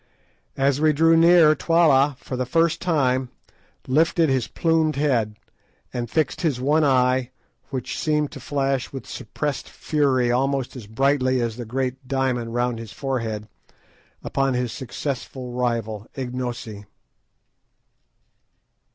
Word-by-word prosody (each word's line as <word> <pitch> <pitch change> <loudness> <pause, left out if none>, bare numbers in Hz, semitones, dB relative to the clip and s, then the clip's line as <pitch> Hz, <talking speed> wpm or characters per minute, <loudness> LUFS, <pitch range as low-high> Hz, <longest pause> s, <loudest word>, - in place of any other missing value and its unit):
As 140 +1 +2
we 155 -1 +4
drew 165 +2 +4
near, 165 -1 +6
Twala, 150 -4 +3
for 130 - -6
the 125 -1 -2
first 165 +4 +2
time, 130 -6 +1 0.6
lifted 165 +4 +2
his 130 -3 +1
plumed 160 -2 +1
head, 125 -7 +1 0.6
and 120 -2 -3
fixed 155 +2 0
his 150 -8 0
one 150 +5 +2
eye, 130 -2 +2 0.4
which 130 -2 -4
seemed 150 -2 0
to 140 - -9
flash 135 -1 -1
with 135 -3 -7
suppressed 145 +5 -4
fury 135 -5 +1
almost 135 +1 0
as 115 -5 -9
brightly 130 +2 +1
as 115 -2 -1
the 120 0 -6
great 130 +2 -3
diamond 130 -3 0
bound 115 - -7
round 120 -1 0
his 115 -2 -8
forehead, 115 -6 -3 0.8
upon 135 -1 0
his 125 -1 -1
successful 130 -1 -5
rival—Ignosi. 120 -1 -4
130 Hz, 125 wpm, -23 LUFS, 125-145 Hz, 0.8 s, near